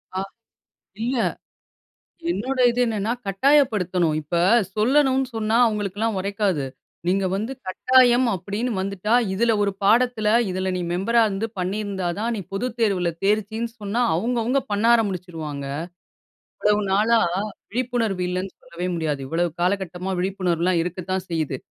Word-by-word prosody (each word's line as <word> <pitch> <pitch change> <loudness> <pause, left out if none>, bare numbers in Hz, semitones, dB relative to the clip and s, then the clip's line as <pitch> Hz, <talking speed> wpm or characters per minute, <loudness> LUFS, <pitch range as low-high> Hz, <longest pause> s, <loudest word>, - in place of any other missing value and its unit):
ஆ - - 0 0.8
இல்ல. 250 +2 0 1.1
என்னுடைய 255 -1 0
இது 245 - -1
என்னன்னா? 220 -1 -1
கட்டாயப்படுத்தணும். 195 - +2
இப்ப 150 +4 -3 0.4
சொல்லணும்னு 265 +3 +3
சொன்னா 220 0 +1
அவங்களுக்குல்லாம் 210 0 -1
ஒரைக்காது. 200 -6 0 0.4
நீங்க 190 +1 +2
வந்து 220 +6 -2
கட்டாயம் 250 +5 +4
அப்படின்னு 205 +7 -3
வந்துட்டா, 200 +2 -2 0.2
இதில 230 +4 +2
ஒரு 200 -1 +1
பாடத்தில 225 +1 +3 0.2
இதில 185 +1 -1
நீ - - -2
மெம்பர்ரா 230 +6 +2
இருந்து, 200 +2 -2
பண்ணியிருந்தா 190 0 -2
தான், 230 +3 -1
நீ - - -3
பொதுத் 230 +4 -3
தேர்வில 190 -6 +2
தேர்ச்சின்னு 215 +3 0
சொன்னா, 205 +3 -2
அவங்க 230 +9 0
அவங்க 255 +5 +1
பண்ண 205 +2 0
ஆரம்பிச்சிடுவாங்க. 175 -9 -2 0.9
இவ்வளவு 210 0 +2
நாளா 220 +4 +4 0.5
விழிப்புணர்வு 230 -5 -1
இல்லன்னு 185 +1 -3
சொல்லவே 170 +1 -5
முடியாது. 155 -4 -2
இவ்ளோ 165 +4 +1 0.2
காலகட்டமா 185 0 -1
விழிப்புணர்வுலாம் 180 -2 0
இருக்கத்தான் 180 +1 -3
செய்யுது. 155 -6 -2
200 Hz, 125 wpm, -23 LUFS, 180-230 Hz, 1.1 s, கட்டாயம்